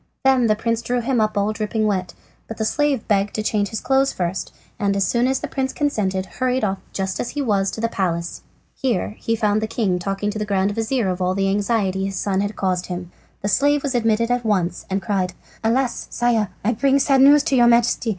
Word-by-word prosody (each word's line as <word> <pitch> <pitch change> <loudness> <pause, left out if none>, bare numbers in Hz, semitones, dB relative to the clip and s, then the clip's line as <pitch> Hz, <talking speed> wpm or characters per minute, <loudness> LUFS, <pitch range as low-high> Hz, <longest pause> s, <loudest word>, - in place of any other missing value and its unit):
Then 260 -3 +4
the 215 - +3
prince 230 +1 -1
drew 245 +1 -1
him 240 0 0
up 215 -1 0
all 205 +2 +1
dripping 215 +1 -1
wet, 185 -4 -1 0.3
but 225 - -7
the 220 - -1
slave 290 -1 0
begged 200 -2 +2
leave - - -22
to 215 - -2
change 205 -2 +1
his 220 +1 -4
clothes 270 +1 +2
first, 180 +1 -3 0.3
and 200 -2 +1
as 195 -1 +2
soon 240 +1 +1
as 265 0 0
the - - -3
prince 265 -1 -2
consented 195 -10 -1
hurried 255 +4 -1
off 195 -2 0
just 190 -1 -3
as 240 - -2
he 290 - -3
was 200 -5 +1
to 220 - -6
the 230 - +2
palace. 170 -5 -2 0.3
Here 240 -9 -1
he 225 - 0
found 215 -1 +1
the 220 - -1
king 200 -6 0
talking 195 +3 -2
to 215 - -5
the - - -1
grand 200 -1 +1
vizir 225 +1 0
of 185 0 -2
all 185 +1 +1
the 195 0 +1
anxiety 200 -2 0
his 195 0 -4
son 190 +1 0
had 205 +1 -3
caused 185 -2 -1
him. 180 -1 -6 0.3
The - - 0
slave 285 +7 +2
was 280 -2 -1
admitted 230 0 +1
at 245 0 +1
once 190 -5 -1
and 195 0 -1
cried: 185 -1 -1 0.3
"Alas, 240 +2 0
Sire! 235 -4 +1 0.2
I 230 - +3
bring 275 +4 +2
sad 275 -1 +3
news 285 +2 +7
to 270 - +1
your 240 -2 +5
Majesty. 235 0 +3
215 Hz, 235 wpm, -21 LUFS, 195-245 Hz, 0.3 s, news